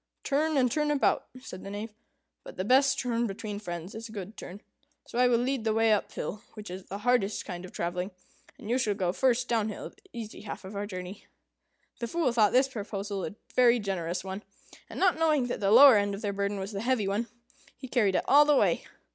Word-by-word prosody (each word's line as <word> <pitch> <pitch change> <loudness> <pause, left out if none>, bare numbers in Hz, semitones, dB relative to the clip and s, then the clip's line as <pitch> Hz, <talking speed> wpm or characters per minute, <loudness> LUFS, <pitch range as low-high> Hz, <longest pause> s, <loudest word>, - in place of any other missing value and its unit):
"Turn, 305 +2 +1
and 250 -3 +3
turn 300 +2 0
about," 290 -2 +1
said 190 - -9
the - - -7
Knave; 210 +2 -6 0.5
"but - - -11
the 185 - -2
best 270 +4 +4
turn 235 -2 0
between 205 +1 -5
friends 175 -2 -6
is 225 +1 -7
a - - -11
good 205 0 -7
turn; 195 +4 -9 0.4
so 240 - -4
I 250 - +6
will 240 -1 +4
lead 255 0 -1
the 220 -1 +1
way 225 -1 +4
up 210 - -1
hill, 210 - -5
which 210 -4 -8
is 185 +1 -7
the 195 - -6
hardest 245 -5 +1
kind 180 -2 -6
of 185 - -11
travelling, 180 +2 -3 0.5
and - - -11
you 245 +3 +1
shall 210 -5 0
go 180 -3 -1
first 250 +1 +2
down 225 -2 +1
hill, - - -6
the - - -27
easy 225 -3 -8
half 205 -2 -7
of 195 +2 -8
our 205 +1 -3
journey." 185 0 -8 0.7
The 235 - -3
Fool 320 -1 0
thought 215 -4 +4
this 260 +2 +4
proposal 200 -5 -5
a 210 - -5 0.2
very 245 -1 +5
generous 185 -5 -3
one, 190 +1 -5 0.5
and, - - -7
not 370 -4 +3
knowing 305 -5 +3
that - - -3
the 195 - +1
lower 250 +2 +9
end 200 0 0
of 200 - -9
their 205 -1 -1
burden 200 +1 -1
was 195 +2 -5
the 200 -1 -4
heavy 235 -4 +1
one, 210 +4 -1 0.5
he 260 - -8
carried 215 -7 +2
it - - +1
all 290 +2 +7
the 295 0 +3
way. - - +2
215 Hz, 230 wpm, -28 LUFS, 195-250 Hz, 0.7 s, lower